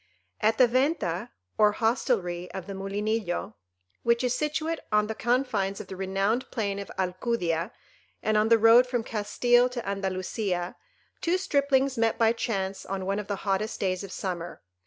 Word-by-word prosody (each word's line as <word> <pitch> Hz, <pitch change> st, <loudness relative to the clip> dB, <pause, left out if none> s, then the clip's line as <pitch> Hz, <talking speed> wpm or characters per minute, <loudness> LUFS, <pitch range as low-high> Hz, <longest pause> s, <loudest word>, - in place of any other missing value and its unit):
At 220 Hz, +1 st, +2 dB
the 255 Hz, -, +6 dB
Venta 245 Hz, -, 0 dB, 0.3 s
or 210 Hz, -1 st, +5 dB
hostelry 205 Hz, -7 st, 0 dB
of 190 Hz, -2 st, -5 dB
the 200 Hz, -, -6 dB
Mulinillo, 200 Hz, 0 st, -2 dB, 0.5 s
which 235 Hz, +1 st, +2 dB
is 250 Hz, -1 st, +1 dB
situate 310 Hz, +3 st, -1 dB
on 210 Hz, 0 st, +4 dB
the 220 Hz, -, -3 dB
confines 220 Hz, -5 st, 0 dB
of -, -, -8 dB
the 190 Hz, -, -6 dB
renowned 195 Hz, +5 st, 0 dB
plain 200 Hz, -4 st, -2 dB
of 200 Hz, -, -7 dB
Alcudia, 185 Hz, -1 st, -1 dB, 0.5 s
and 215 Hz, -, +1 dB
on 215 Hz, +1 st, +3 dB
the 230 Hz, -, +7 dB
road 230 Hz, +3 st, +7 dB
from 245 Hz, -2 st, -1 dB
Castile 240 Hz, +3 st, +2 dB
to 245 Hz, -2 st, -6 dB
Andalusia, 190 Hz, -1 st, -2 dB, 0.5 s
two 345 Hz, +2 st, +2 dB
striplings 280 Hz, -7 st, +1 dB
met 225 Hz, -1 st, +2 dB
by 225 Hz, 0 st, +4 dB
chance 195 Hz, -4 st, -2 dB
on 190 Hz, -1 st, -4 dB
one 195 Hz, +2 st, 0 dB
of 210 Hz, -, -6 dB
the 205 Hz, -, -1 dB
hottest 200 Hz, +2 st, -1 dB
days 185 Hz, 0 st, -1 dB
of 195 Hz, -, -8 dB
summer. 175 Hz, -, -5 dB
215 Hz, 165 wpm, -27 LUFS, 195-240 Hz, 0.5 s, the